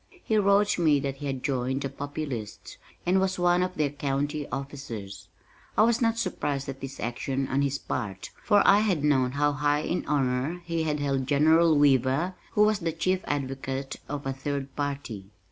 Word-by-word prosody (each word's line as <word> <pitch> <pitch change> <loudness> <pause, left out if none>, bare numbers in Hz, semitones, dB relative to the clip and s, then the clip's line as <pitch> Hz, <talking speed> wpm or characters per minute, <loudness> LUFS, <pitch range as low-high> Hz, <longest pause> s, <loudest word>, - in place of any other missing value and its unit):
He 220 - 0
wrote 200 -1 +3
me 155 -4 +4
that 135 -1 -3
he 145 - -5
had 135 -2 -3
joined 130 -1 -1
"the 135 - -2
Populists," 140 -5 -6 0.3
and 185 +2 +3
was 190 0 0
one 175 0 +3
of 185 0 -1
their 150 -3 0
County 145 +1 -2
officers. 120 - -6 0.5
I - - +6
was 235 +1 +3
not 230 -1 +2
surprised 145 -9 -2
at 135 0 -7
this 135 0 -7
action 130 +3 -2
on 135 +1 0
his 140 0 0
part, 95 -7 -5
for 205 -2 +4
I 200 - +7
had 190 -9 +1
known 130 -4 +2
how 145 +1 +2
high 145 +1 +1
in 175 +3 -2
honor 140 +4 0
he 165 -1 -1
held 140 -3 -1
General 160 +3 +4
Weaver 140 +5 +3 0.2
who 210 - +5
was 210 -1 +3
the 165 -3 -1
chief 185 +3 0
advocate 135 -1 -3
of 145 -1 -4
a 135 - -1
third 140 0 -4
party. 135 -9 -4
145 Hz, 180 wpm, -27 LUFS, 135-170 Hz, 0.5 s, I